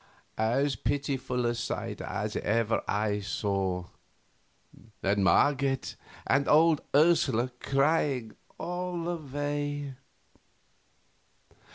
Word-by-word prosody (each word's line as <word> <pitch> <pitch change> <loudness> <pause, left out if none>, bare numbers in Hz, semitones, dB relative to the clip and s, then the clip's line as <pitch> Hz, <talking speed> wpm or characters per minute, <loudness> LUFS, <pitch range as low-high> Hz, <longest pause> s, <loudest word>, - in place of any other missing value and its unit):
As 130 +5 +2
pitiful 130 -1 -1
a 120 - +2
sight 120 0 -4
as - - -3
ever 115 +1 +1
I 105 0 0
saw. 95 -3 -1 1.2
And 100 0 +2
Marget, 135 +5 +2 0.3
and 140 +1 +2
old 160 0 +5
Ursula 140 -6 +3
crying 135 -5 +1 0.2
all 180 0 -3
the 175 +1 -2
way. 145 -1 -3
135 Hz, 85 wpm, -29 LUFS, 110-145 Hz, 1.2 s, old